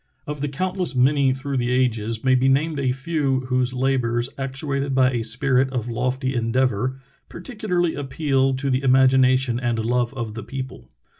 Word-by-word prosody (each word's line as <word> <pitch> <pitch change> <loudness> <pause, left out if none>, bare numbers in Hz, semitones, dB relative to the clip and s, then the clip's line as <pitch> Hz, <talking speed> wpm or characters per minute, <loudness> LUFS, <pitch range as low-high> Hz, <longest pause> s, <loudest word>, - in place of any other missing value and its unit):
Of 150 -1 -6
the 145 - -1
countless 180 0 -1
many 135 +1 +3
through 135 +1 -3
the 120 -1 0
ages 115 -3 0
may 130 -1 +3
be 130 +1 +3
named 150 +3 +1
a 130 -2 +1
few 135 -1 -1
whose 125 -1 0
labors, 125 -2 0
actuated 135 0 -3
by 130 -1 +4
a 120 -2 -1
spirit 130 +3 +1
of 125 -3 -3
lofty 130 +3 -1
endeavor, 125 +1 0 0.3
particularly 180 -4 -2
appeal 135 -1 0
to 135 +1 -2
the 130 +1 +1
imagina 130 -1 +4
tion 125 -2 -2
and 120 -2 -1
love 120 +2 0
of 115 -4 -4
the 115 - -6
people. 130 - -7
130 Hz, 170 wpm, -22 LUFS, 125-135 Hz, 0.3 s, by